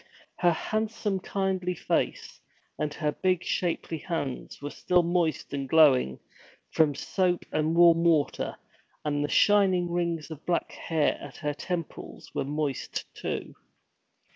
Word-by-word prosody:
Her 175 - +4
handsome 215 +2 -1
kindly 185 -2 -1
face - - -2 0.4
and 150 -1 -1
her 150 -2 0
big 185 +3 0
shapely 170 -2 -1
hands 150 -8 -4
were 145 +1 -5
still 180 -1 +2
moist 170 -4 0
and 135 -1 -3
glowing 135 - +5 0.5
from 150 -3 +3
soap 180 +2 0
and 155 +1 +1
warm 170 -1 +6
water, 160 -4 +1 0.5
and 145 -1 0
the 145 - -2
shining 190 -4 +4
rings 170 -2 -1
of 155 0 -8
black 175 -1 -1
hair 160 -3 0
at 145 - -9
her 150 -2 -2
temples 170 +2 -6
were - - -1
moist, 145 -1 -3
too. - - -4
165 Hz, 135 wpm, -28 LUFS, 150-180 Hz, 0.5 s, warm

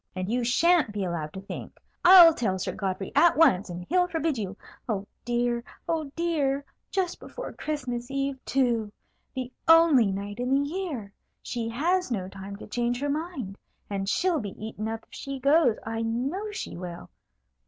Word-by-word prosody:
"And 185 +2 -3
you 245 +1 +1
sha'n't 300 +2 +3
be 205 -1 -3
allowed 170 -4 -3
to 190 - -7
think. 195 - -8 0.2
I'll 350 -2 +10
tell 205 -9 -1
Sir 185 - -2
Godfrey 195 -1 -3
at 330 +3 +5
once, 205 - +4
and 175 0 -6
he'll 360 +3 +3
forbid 325 -3 -1
you. 205 -3 -4 0.3
Oh, 200 -3 -1 0.2
dear! 240 0 0 0.2
oh, 315 -4 -1
dear! 285 -5 0 0.2
just 370 -3 -1
before - - -8
Christmas 250 -5 -4
Eve, 275 -1 -2
too! 235 -5 +1 0.4
The 255 -1 -4
only 325 -8 +7
night 200 +3 -5
in 250 +1 -1
the 285 +1 +1
year! 295 - -4 0.3
She 230 -2 -3
has 345 +9 +1
no 195 -7 -2
time 195 +1 -8
to 200 - -10
change 240 +2 -1
her 285 +1 -1
mind; 285 - -4 0.3
and 195 -1 -2
she'll 355 - +2
be 205 -6 -6
eaten 220 -1 -5
up 225 0 -4
if - - -45
she 275 -1 -6
goes, 275 -3 +4
I 225 0 -3
know 265 - -2
she 420 - -6
will. 175 -1 -8
245 Hz, 175 wpm, -27 LUFS, 205-315 Hz, 0.4 s, I'll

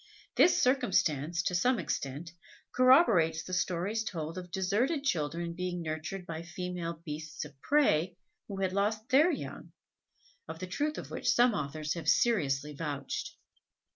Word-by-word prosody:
This 355 - +5
circumstance, 170 - +1
to 180 - -1
some 245 +8 +2
extent, 155 -2 -4 0.4
corroborates 230 - +5
the 185 - -8
stories 185 +4 0
told 165 -6 -5
of 180 -1 -7
deserted 215 - 0
children 170 - -1
being 180 0 -3
nurtured 160 +4 -4
by 165 -1 -5
female 170 -1 -5
beasts 155 0 -5
of 140 -2 -15
prey 180 - +2 0.3
who 195 -2 -5
had 185 -1 0
lost 215 +3 -1
their 290 +7 +5
young, 315 - -5 0.7
of 160 - -6
the 185 - -5
truth 295 +12 -2
of - - -7
which - - -2
some 245 -1 +4
authors 150 -1 -3
have 165 -3 -2
seriously 150 - +2
vouched. 145 -2 -4
175 Hz, 145 wpm, -31 LUFS, 160-215 Hz, 0.7 s, This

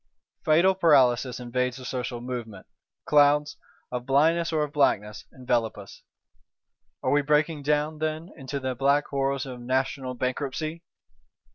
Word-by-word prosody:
Fatal 170 +3 +4
paralysis 130 -8 +3
invades 125 +1 -2
the 130 - -10
social 125 -2 -4
movement; 120 -5 -6 0.4
clouds, 145 0 +4 0.4
of 125 0 -4
blindness 165 +5 +3
or 155 -2 +1
of 150 -1 -5
blackness, 105 -7 +1
envelop 120 -4 -1
us: 100 -1 -12 1.0
are 130 - +1
we 145 - +4
breaking 150 +1 +1
down, 150 +2 0
then, 155 +3 -3
into 140 -1 -5
the 130 -1 -2
black 140 +3 +2
horrors 140 0 -1
of 125 -2 -8
NATIONAL 130 +1 -2
BANKRUPTCY? 145 +6 -3
135 Hz, 135 wpm, -26 LUFS, 125-150 Hz, 1.0 s, Fatal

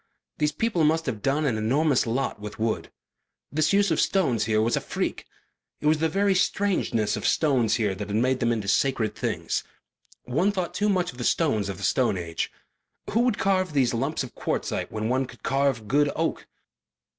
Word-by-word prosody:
These 150 0 +1
people 195 -2 0
must 160 +2 +2
have 110 -6 -3
done 145 +5 +1
an 115 -6 0
enormous 135 +4 +2
lot 125 0 -1
with 105 0 -7
wood. 110 0 -1 0.6
This 155 +1 +1
use 200 -2 +3
of 160 - +2
stones 130 - +1
here 110 0 +2
was 115 +2 +2
a - - -1
freak. - - -3 0.5
It - - -8
was 155 0 +4
the 160 +1 +1
very 195 +4 +2
strangeness 180 - +1
of - - -2
stones 125 -8 +2
here 105 -4 0
that 100 +1 -6
had 105 - -3
made 130 +3 +2
them 120 0 +1
into 110 -4 -2
sacred 110 +1 +1
things. - - -2 0.6
One 160 +11 +1
thought 185 -4 -3
too 210 +1 +1
much 180 -3 +1
of 125 - -15
the - - -3
stones 110 - +1
of 95 - -5
the 100 - -9
Stone 120 -5 +2
Age. 85 -2 -3 0.6
Who 225 - +2
would 240 -3 +2
carve 185 -4 +1
these 130 -4 +2
lumps 135 +6 -1
of 125 - -9
quartzite - - -3
when 110 0 -2
one 130 +2 0
could - - -15
carve 135 -5 0
good 145 +4 +3
oak? 165 +1 -2
135 Hz, 200 wpm, -25 LUFS, 110-160 Hz, 0.6 s, was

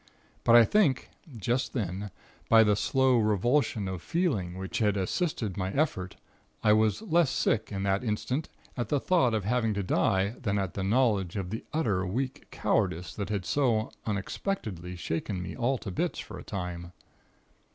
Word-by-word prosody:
But 115 - +6
I 120 -1 +9
think, 170 - +2 0.3
just 120 +5 -1
then, 100 -3 -3 0.4
by 115 -1 +8
the 105 -1 +3
slow 130 +3 +3
revulsion 110 +1 +1
of 95 -3 -4
feeling 115 - -1
which 95 -2 -4
had 105 -3 +2
assisted 110 - -1
my 95 -1 -1
effort, 95 - -1 0.5
I 105 - +6
was 110 - +2
less 170 -7 +3
sick, 110 -4 0
in 100 -1 -3
that 100 +2 +1
instant, 125 +6 -2 0.3
at 120 -4 -3
the 145 - +2
thought 130 -9 +2
of 105 -3 -2
having 115 -1 +1
to 100 - -1
die, 95 +1 +2
than 100 -5 0
at 95 -3 -2
the 95 - -3
knowledge 105 -4 +2
of 95 -3 -3
the 110 - -4
utter 110 -12 0
weak 125 +8 -3
cowardice 80 -1 0
that 100 -1 -4
had 100 -3 -2
so 120 -5 +1 0.2
unexpectedly 100 - -3
shaken 85 +3 -3
me 90 - -5
all 130 +2 +1
to 100 - -6
bits, - - -1
for - - -7
a - - -9
time. 90 -2 -5
105 Hz, 170 wpm, -29 LUFS, 95-125 Hz, 0.5 s, I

